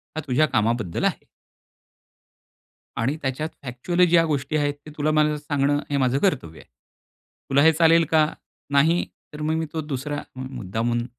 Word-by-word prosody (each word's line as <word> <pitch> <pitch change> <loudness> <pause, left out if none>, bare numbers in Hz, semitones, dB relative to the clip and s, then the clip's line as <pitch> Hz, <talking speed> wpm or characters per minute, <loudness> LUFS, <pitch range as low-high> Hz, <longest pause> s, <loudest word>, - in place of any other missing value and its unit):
हा 155 - -2
तुझ्या 140 +4 +3
कामाबद्दल 110 -4 0
आहे. - - -1 1.7
आणि 135 +7 -1
त्याच्यात 140 +4 -2
फॅक्च्युअल 140 +8 0
ज्या 165 -1 +5
गोष्टी 150 -1 -1
आहेत 145 -1 0
ते 155 - -10
तुला 150 +1 +1
मला 150 0 +2
सांगणं, 145 -1 0
हे 145 - 0
माझं 130 0 +2
कर्तव्य 125 - -1
आहे. - - -17 0.8
तुला 140 +1 +4
हे 160 +1 +7
चालेल 165 +1 +4
का? 155 -1 +5 0.5
नाही, 160 +5 +3 0.3
तर 150 - -8
मग 155 +1 0
मी 160 - -1
तो 160 - -2
दुसरा 145 0 -4
मुद्दामून, 120 -2 -3
145 Hz, 155 wpm, -23 LUFS, 130-155 Hz, 1.7 s, हे